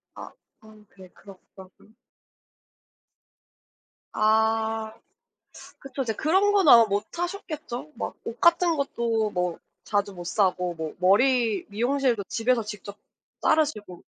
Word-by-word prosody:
아 - - -10 0.3
음 215 -1 -17
그래. 190 -2 -15
그럼, 195 -2 -14 0.2
그럼. 190 -1 -12 2.4
아. 220 0 +1 0.9
그쵸. 275 0 -6
인제 225 -4 -2
그런 380 - +2
거는 390 -7 +5
아마 230 -1 +8
못 205 0 -1
하셨겠죠. 310 - -5
막 - - -5
옷 235 - -7
같은 340 0 +4
것도 230 -6 -1
뭐 180 -1 -2 0.3
자주 205 -2 -1
못 175 -1 -9
사고 180 -2 0
뭐 160 -1 -5
머리 220 +2 +2
미용실도 240 0 0
집에서 235 0 0
직접 205 -1 -9 0.4
자르시고. 290 - 0
220 Hz, 220 characters per minute, -25 LUFS, 200-275 Hz, 2.4 s, 아마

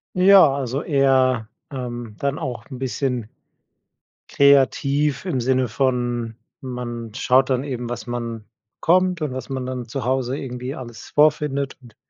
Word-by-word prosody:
Ja, 185 -6 +7
also 135 +2 -2
eher, 130 -5 +2 0.2
ähm, 120 -5 -6
dann 140 +1 -1
auch 130 -7 -5
'n 130 - -7
bisschen, 125 -2 -2 1.0
kreativ 140 +2 +3
im 135 -8 -1
Sinne 130 0 +1
von, 120 -2 -1 0.2
man 120 -4 -6
schaut 130 +1 +3
dann 130 +1 +1
eben, 125 -4 -4
was 120 -2 -5
man 115 -2 -4 0.4
bekommt 180 0 +3
und 150 -4 -2
was 130 +1 -6
man 130 -1 -3
dann 125 -2 -4
zu 125 +1 -5
Hause 130 +1 0
irgendwie 125 0 -5
alles 120 -3 -9
vorfindet 150 -2 +2
und 115 -3 -17
130 Hz, 145 wpm, -22 LUFS, 120-140 Hz, 1.0 s, Ja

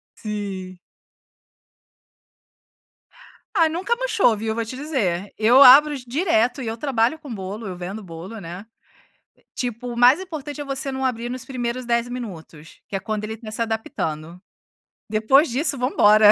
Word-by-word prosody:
Sim. 195 -4 -6 2.8
Ah, 330 -4 +5
nunca 370 +9 -1
murchou, 470 - +2
viu? 220 +1 -2
Vou 230 - -1
te 225 - -7
dizer, 205 - -2
eu 235 +5 +5
abro 280 +1 +8
direto 255 - +1
e 240 - -5
eu 225 +1 -3
trabalho 250 +1 +1
com 290 -6 -8
bolo, 205 +2 -6
eu 185 - -5
vendo 190 +4 -6
bolo, 180 +5 -9
né. 180 +2 -8 0.9
Tipo, 245 -1 -4
o - - -8
mais 245 +6 +6
importante 305 -6 -7
é - - -3
você 275 0 -3
não 265 0 -2
abrir 240 -2 -2
nos 250 -1 -6
primeiros 250 -1 -3
10 235 0 0
minutos, 170 -10 -9
que - - -6
é - - 0
quando 215 +1 -4
ele 220 +1 -5
começa 220 0 -4
adaptando. 175 -7 -4 0.7
Depois 225 +8 +4
disso 280 +4 0
vambora. 215 -4 +6
230 Hz, 150 wpm, -22 LUFS, 210-265 Hz, 2.8 s, abro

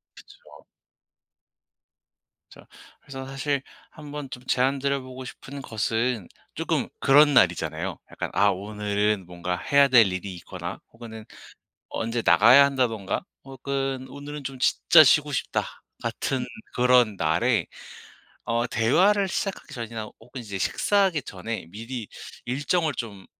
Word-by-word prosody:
그쵸. - - -17 1.9
진짜. - - -16 0.3
그래서 135 -2 -8
사실 135 +1 -2 0.3
1 150 -3 -11
번 145 -2 -6
좀 125 0 -9
제안드려 140 +2 +1
보고 130 0 -9
싶은 140 +2 -9
것은 115 -2 -1 0.3
쪼끔 - - -1
그런 145 +2 +6
날이잖아요. 90 - +1
약간 - - -4
아 100 +1 +4
오늘은 105 0 -1
뭔가 90 +1 -4
해야 140 +8 +4
될 120 -5 +6
일이 95 0 -5
있거나 85 - -7
혹은 115 -2 -11
은 110 -1 -9 0.6
언제 115 +1 -2
나가야 115 +11 +7
한다든가 125 -8 -1 0.2
혹은 135 0 -3
오늘은 145 0 -8
좀 135 0 -6
진짜 155 +5 +6
쉬고 145 +3 +3
싶다 - - -1 0.4
같은 - - -2 0.3
그런 125 -4 +4
날에 80 -1 +1 0.8
어 120 +2 0
대화를 180 - +3
시작하기 195 +1 -4
전이나 115 -2 -5 0.2
혹은 125 +3 -10
이제 100 -4 -6
식사하기 185 - +1
전에 105 +3 -6
미리 115 +3 -7 0.4
일정을 145 +4 0
좀 105 -6 -7
125 Hz, 265 characters per minute, -25 LUFS, 110-140 Hz, 1.9 s, 나가야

